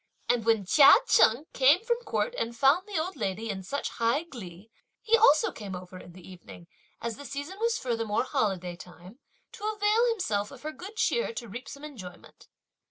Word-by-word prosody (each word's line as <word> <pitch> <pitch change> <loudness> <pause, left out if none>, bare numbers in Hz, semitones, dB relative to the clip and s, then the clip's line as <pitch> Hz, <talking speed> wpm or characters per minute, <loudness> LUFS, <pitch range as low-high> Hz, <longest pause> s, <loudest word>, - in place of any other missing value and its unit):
And 235 -2 +1
when 225 -3 +2
Chia 275 - +8
Cheng 270 - +4
came 285 +9 +4
from 475 0 +1
court - - -2
and 235 - -3
found 290 - +3
the 405 -4 -4
old 350 +3 -3
lady 215 -2 -3
in 190 -1 -6
such 280 +10 -4
high 235 +7 +2
glee 215 - -11 0.3
he 455 - +3
also 430 -9 +4
came 200 -4 -7
over 180 0 -10
in 175 - -13
the 185 -1 -14
evening, 180 -2 -13 0.3
as 230 -1 -5
the 285 - -10
season 285 +8 -7
was 460 0 +1
furthermore 230 -3 -1
holiday 195 - -2
time, 180 +6 -14 0.3
to - - -13
avail 425 +3 +2
himself 215 - -1
of 270 -1 -13
her 310 - -4
good 375 +7 -10
cheer 465 +1 0
to 235 - -6
reap 235 +5 -8
some 280 - -10
enjoyment. 200 -13 -11
245 Hz, 190 wpm, -28 LUFS, -, 0.3 s, Chia